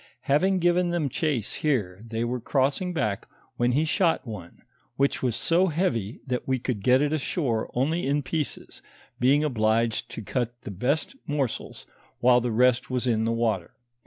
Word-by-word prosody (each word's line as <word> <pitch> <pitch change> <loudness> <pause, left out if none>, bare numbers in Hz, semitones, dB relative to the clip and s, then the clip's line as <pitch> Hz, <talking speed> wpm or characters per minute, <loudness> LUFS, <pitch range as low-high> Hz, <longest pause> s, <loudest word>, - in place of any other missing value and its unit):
Having 185 +7 +2
given 175 0 +2
them 170 -5 0
chase 135 - -1
here, 105 -11 0
they 115 0 -3
were 125 +1 -2
crossing 140 +8 0
back 105 - -2 0.3
when 120 +1 +2
he 150 +5 +2
shot 165 -1 +1
one, 105 -7 -9 0.3
which 140 +2 +1
was 125 -3 0
so 175 +3 +3
heavy 150 - -1
that 125 -2 -3
we 130 0 +2
could 120 -4 -3
get 130 +6 +4
it 150 +1 0
ashore 135 -6 -1
only 150 +6 0
in 145 +1 +1
pieces, 150 +2 -4 0.4
being 140 +4 +4
obliged 115 -4 +1
to 115 - -7
cut 120 +3 -3
the - - -7
best 135 - -1
moreels, 140 -5 -3 0.3
while 125 0 +5
the 120 - -1
rest 125 +2 +3
was 125 -1 -1
in 110 -3 +1
the 115 - +1
water. 115 -6 -1
125 Hz, 170 wpm, -26 LUFS, 115-150 Hz, 0.4 s, while